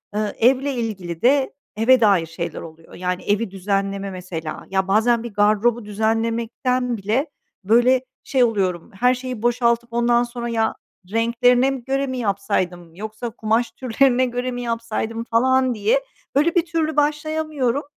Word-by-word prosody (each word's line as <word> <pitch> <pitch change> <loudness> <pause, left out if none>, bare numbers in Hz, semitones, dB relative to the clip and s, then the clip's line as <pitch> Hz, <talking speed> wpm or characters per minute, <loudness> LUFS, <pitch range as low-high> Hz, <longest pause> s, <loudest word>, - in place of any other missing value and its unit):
Eee, 210 -1 -1
evle 265 +4 +3
ilgili 195 -9 -4
de, 265 +2 +3 0.2
eve 240 +4 +4
dair 200 -6 +4
şeyler 165 +1 -5
oluyor, 165 0 -13
yani, 180 0 -3
evi 205 0 0
düzenleme 195 0 -2
mesela. 175 -4 -6
Ya, 190 -1 0
bazen 225 +4 +3
bir 235 -3 -7
gardırobu 215 +3 +2
düzenlemekten 230 +3 -1
bile, 220 +9 0 0.4
böyle, 240 +5 +4 0.2
şey 260 -2 +2
oluyorum, 190 -7 0
her 250 +2 +4
şeyi 250 -3 -6
boşaltıp 235 0 +1
ondan 240 0 +3
sonra, 240 0 -5
"Ya, 225 -1 0 0.4
renklerine 245 +3 +3
mi 265 -3 -5
göre 270 +2 -1
mi 260 -1 -4
yapsaydım, 195 -6 -2
yoksa 215 +4 -6
kumaş 225 +1 0
türlerine 255 +1 +2
göre 245 +1 -3
mi 245 0 -4
yapsaydım?" 230 -1 -3
falan, 255 +2 +2
diye, - - +1 0.3
böyle, 320 +5 +3
bir 350 - +3
türlü 325 -2 -1
başlayamıyorum. 300 -3 0
235 Hz, 145 wpm, -21 LUFS, 205-255 Hz, 0.4 s, eve